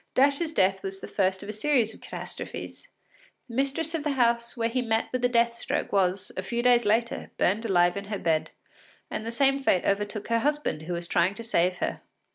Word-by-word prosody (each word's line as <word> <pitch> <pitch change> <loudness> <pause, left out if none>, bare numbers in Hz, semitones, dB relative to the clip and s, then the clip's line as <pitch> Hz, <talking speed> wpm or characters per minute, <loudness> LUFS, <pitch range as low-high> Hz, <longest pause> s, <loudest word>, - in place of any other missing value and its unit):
Dash’s 285 +4 +3
death 190 -6 +2
was 195 0 -5
the - - -8
first 190 -1 0
of 200 - -8
a - - -3
series 230 -1 +1
of - - -16
catastrophes: - - -7 0.6
the 235 - -11
mistress 275 +5 0
of 320 -3 -2
the 300 -2 0
house 235 -2 +1
where 230 -1 +1
he 250 +2 -1
met 225 -2 0
with 255 - -1
the 245 - +3
death 235 -1 +3
stroke 235 - -3
was, 190 -1 +1
a - - -2
few 235 +5 -2
days 245 -1 +5
later, 225 +3 0
burned 210 +5 +1
alive 175 -4 +3
in 200 0 -5
her 205 0 -3
bed, 160 -4 0 0.6
and 220 - -4
the - - -2
same 275 +3 +2
fate 185 -9 +2
overtook 205 +1 -1
her 230 0 +3
husband 290 - -1
who 170 +3 -4
was 170 0 -4
trying 175 +4 +2
to 230 - -7
save 180 -5 +1
her. - - -3
225 Hz, 220 wpm, -27 LUFS, 190-250 Hz, 0.6 s, days